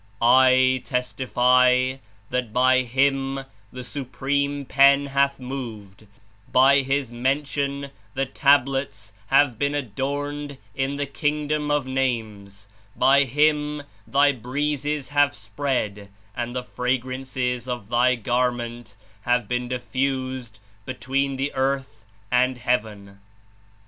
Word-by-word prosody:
"I 130 +1 +5
testify 125 0 +2 0.3
that 125 -3 -2
by 130 +2 +4
Him 135 +2 0 0.3
the 125 0 -7
Supreme 140 +2 -2
Pen 140 +1 +5
hath 140 0 +1
moved, 110 -6 -8 0.4
by 135 +2 +6
His 135 -2 -1
mention 140 +2 -2 0.2
the 135 +1 0
Tablets 135 -6 +1
have 135 -3 +3
been 145 0 0
adorned 145 +3 -4 0.2
In 135 +1 -2
the 145 0 -2
Kingdom 150 +1 -1
of 145 -2 +1
Names, 110 -7 -3 0.3
by 140 +1 +4
Him 150 +2 +1 0.2
Thy 140 +1 +4
Breezes 145 +2 -2
have 145 0 +2
spread 105 -1 -3 0.3
and 120 +1 -4
the 125 - -2
fragrances 125 0 -2
of 120 -5 -5
Thy 125 +2 +3
Garment 120 -1 -2 0.3
have 120 -2 +1
been 125 +1 -2
diffused 130 -2 -3 0.2
between 135 +3 -2
the 135 +2 -2
earth 130 -5 -2 0.3
and 125 +1 +2
heaven." 105 -5 -3
130 Hz, 110 wpm, -23 LUFS, 125-140 Hz, 0.4 s, by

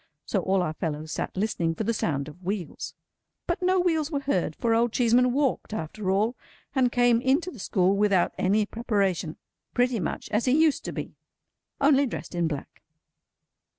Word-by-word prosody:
So, 200 - 0
all 190 0 +1
our 155 - -2
fellows 155 -1 -4
sat - - -4
listening 175 -5 0
for 220 - -2
the 230 +2 0
sound 140 -9 -1
of 155 +4 -12
wheels. 190 -2 -4 0.5
But 345 - -2
no 370 +1 +3
wheels 320 -4 +1
were 285 -4 -2
heard, 185 - 0
for 230 -1 +1
Old 230 +1 +2
Cheeseman 245 +1 +4
walked 265 -5 0
after 185 +3 -4
all, 210 +6 +2 0.4
and 255 -3 +2
came 245 -1 +3
into 290 +8 +1
the 245 - -12
school 190 0 +2
without 200 -3 +2
any 205 +3 +2
preparation. 200 -8 -1 0.4
Pretty 245 -2 +2
much - - -3
as 215 +3 +1
he 265 +4 +3
used 315 -3 +3
to - - -3
be, - - -6 0.6
only 280 -1 +4
dressed 235 - -6
in 175 -1 +1
black. 150 -3 -6
220 Hz, 180 wpm, -26 LUFS, 180-255 Hz, 0.6 s, Cheeseman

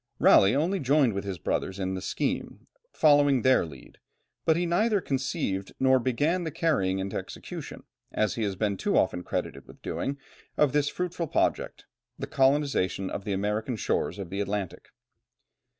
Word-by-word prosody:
Raleigh 100 +5 +6
only 175 +7 +1
joined 135 -3 +3
with 100 +1 -4
his 95 -2 -4
brothers 95 +4 -2
in 95 -1 -2
the 95 - -4
scheme, - - -3 0.3
following 145 -4 +4
their 130 -9 +4
lead, 70 -5 -14 0.5
but 160 0 +3
he 175 - 0
neither 205 +5 +2
conceived 130 - -2
nor 130 0 +4
began 145 +9 0
the 165 - -2
carrying 140 - 0
into 95 0 -3
execution - - -8 0.3
as 110 - 0
he 115 - -4
has 100 -3 -1
been 100 0 -1
too - - 0
often 90 - +1
credited - - -4
with - - -16
doing 140 +1 -3 0.4
of 145 -3 +3
this 145 0 +2
fruitful 175 -1 -3
project, - - -1 0.3
the - - -4
colonization 135 -9 +1
of 100 - -5
the 100 - -1
American 105 +5 -1
shores 105 - -1
of 95 -3 -7
the 100 +1 -2
Atlantic. 100 -2 -4
125 Hz, 165 wpm, -27 LUFS, 100-150 Hz, 0.5 s, Raleigh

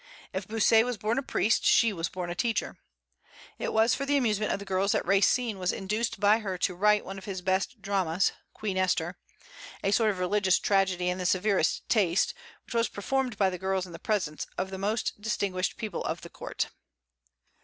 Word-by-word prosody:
If 190 0 -4
Bossuet 225 +1 +4
was 250 0 -2
a - - -16
born 220 +6 0
priest, 230 -4 +1
she 230 -2 +4
was 165 -3 -2
a - - -11
born 175 -1 -4
teacher. 230 +4 -1 0.8
It - - -2
was 225 +2 +4
for 275 - -2
the 285 +1 +2
amusement 215 -5 +1
of - - 0
the 200 - -9
girls 195 +1 +1
that - - 0
Racine 200 +3 +2
was 180 0 +1
induced 215 +3 -2
by 205 +2 +4
her 195 -4 -4
to 180 +1 0
write 210 +3 +3
one 195 +1 -6
of 190 - -13
his 190 -3 -5
best 190 +4 -1
dramas, 190 -3 +1 0.2
"Queen 200 -3 -4
Esther," 175 -1 0 0.6
a 195 - +2
sort 220 +1 +3
of 200 - -1
religious 185 +1 +2
tragedy 190 -3 +1
in 180 +1 -2
the 180 - 0
severest 190 -2 +1
taste, 195 -5 +2 0.3
which - - -9
was 230 0 +2
performed 250 +2 -2
by 195 -2 +3
the 180 - -5
girls 190 -1 -1
in 180 - -12
the 165 - -9
presence 180 -9 -2
of 190 +1 -2
the 190 - -5
most 210 +1 -2
distinguished 200 -3 -1
people 215 -5 -4
of - - -3
the - - -11
court. - - -4
195 Hz, 205 wpm, -28 LUFS, 185-215 Hz, 0.8 s, Bossuet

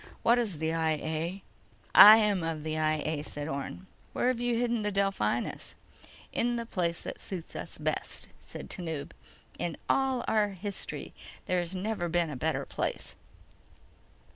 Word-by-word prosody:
What 235 +1 +5
is 210 -9 -1
the 160 +1 -1
I 160 -1 +2
A?" 160 +5 -3 0.5
"I 215 +2 +12
am 210 -4 +2
of 160 -2 -3
the 155 0 -2
I 155 -1 +1
A," 155 -1 -1
said 145 -1 -5
Orne. 140 +5 -5 0.3
"Where've 250 -1 +1
you 245 -1 +1
hidden 240 -1 +1
the 210 0 -1
Delphinus?" 195 - -1 0.6
"In 240 +1 +1
the 235 -1 -3
place 170 -6 -1
that - - -6
suits 180 -4 -6
us - - -6
best," - - -3
said - - -9
Tanub. 160 -6 -5 0.5
"In 170 -3 -2
all 265 -2 +1
our 215 -2 +3
history 200 +1 -6 0.3
there 180 - +1
has 175 +1 -3
never 185 -2 -2
been 170 -1 +1
a - - -5
better 125 - -1
place." - - -3
180 Hz, 160 wpm, -30 LUFS, 160-215 Hz, 0.6 s, I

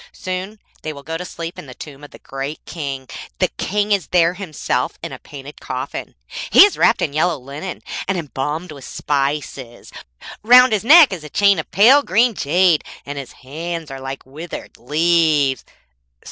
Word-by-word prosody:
Soon 185 +3 -5 0.2
they 155 - -4
will 140 -2 -11
go 160 +3 -5
to 170 - -4
sleep 170 -1 -7
in - - -10
the 125 - -11
tomb 145 -1 -11
of 145 - -10
the - - -14
great 135 +3 -6
King. 140 -4 -6 0.3
The - - +1
King 205 - -2
is 195 -7 +1
there 175 -1 +3
himself 185 -5 -3
in - - -5
his - - -8
painted 145 0 -11
coffin. - - -6 0.3
He - - +9
is 410 - -1
wrapped - - +3
in 140 - -2
yellow 160 +2 +1
linen, 140 +8 -8 0.2
and 195 -1 0
embalmed 155 +2 -4
with 140 -3 -11
spices. 140 -4 -3 0.5
Round 250 +2 +7
his 210 - 0
neck 295 - +7
is 170 -5 -7
a 150 - -9
chain 200 +2 +3
of 160 - -6
pale 250 +9 +6
green 235 0 +2
jade, 175 0 +2 0.2
and 145 0 -5
his 135 - -9
hands 165 +2 -5
are 135 0 -8
like 135 0 -7
withered 155 +6 -9
leaves.' 150 0 +2
160 Hz, 180 wpm, -19 LUFS, 140-185 Hz, 0.5 s, He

